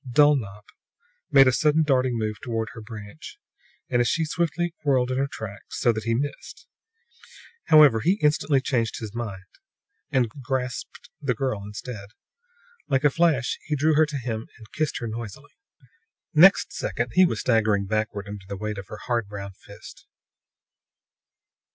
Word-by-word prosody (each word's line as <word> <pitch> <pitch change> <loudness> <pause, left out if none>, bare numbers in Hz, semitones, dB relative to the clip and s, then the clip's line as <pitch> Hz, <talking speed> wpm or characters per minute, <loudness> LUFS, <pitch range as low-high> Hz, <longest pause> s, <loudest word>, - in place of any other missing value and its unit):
Dulnop 120 -8 +3 0.6
made 135 -1 +7
a - - +5
sudden 150 +5 +3
darting 130 -4 +1
move 110 -1 -2
toward 115 -2 -3
her 115 - -9
branch, 110 - -10 0.5
and 120 -1 +2
she 165 - +1
as 155 - -4
swiftly 170 0 -1
whirled 130 -3 +2
in 130 - -1
her 140 - +1
tracks, 105 -6 -8
so 120 - +4
that 110 0 -5
he 115 0 +1
missed. 140 +3 -5 1.0
However, 150 -7 +7
he 170 - +3
instantly 150 -6 +2
changed 115 -4 -1
his 110 -3 -7
mind 105 -5 -5 0.6
and 130 -3 +2
grasped 130 -1 -4
the 130 -4 0
girl 130 -4 -2
instead. 105 0 -8 0.8
Like 135 0 +1
a 145 - +5
flash 155 -5 +1
he 150 - -1
drew 155 +3 +2
her 155 +1 +4
to 145 -1 -4
him 115 -3 -4
and 110 -3 -16
kissed 155 -1 -1
her 120 - -4
noisily. 115 +4 -7 0.8
Next 180 +5 +6
second 120 0 -3
he 185 - +6
was 180 - +1
staggering 110 -4 +2
backward 105 -1 -2
under 100 -2 -9
the 100 - -4
weight 105 0 -4
of 95 - -9
her 110 - -8
hard 120 -4 -1
brown 100 -1 -7
fist. 95 - -14
125 Hz, 160 wpm, -25 LUFS, 110-145 Hz, 1.0 s, made